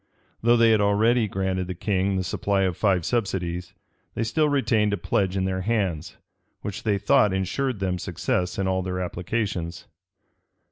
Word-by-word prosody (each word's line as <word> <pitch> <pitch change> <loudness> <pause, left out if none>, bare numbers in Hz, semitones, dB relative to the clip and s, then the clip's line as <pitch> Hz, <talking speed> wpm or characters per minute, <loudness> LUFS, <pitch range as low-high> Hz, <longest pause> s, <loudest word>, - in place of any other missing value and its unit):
Though 120 +1 +4
they 115 -1 +5
had 110 -1 +4
already 110 +3 +3
granted 95 -2 -2
the 90 - -4
king 95 +1 0
the 95 - 0
supply 95 +2 0
of 90 -2 0
five 95 -4 +1
subsidies, 90 -5 -2 0.4
they 115 - -1
still 150 +7 +1
retained 115 -7 +2
a - - 0
pledge 95 +2 0
in 95 - 0
their 95 0 -1
hands, 95 -7 -1 0.4
which 100 -2 -5
they 105 -3 +1
thought 100 +1 +3
insured 100 +6 -1
them 90 -2 -1
success 90 +1 -2
in 95 -1 0
all 95 0 +1
their 90 0 -3
applications. 90 -1 -3
95 Hz, 170 wpm, -25 LUFS, 90-110 Hz, 0.4 s, they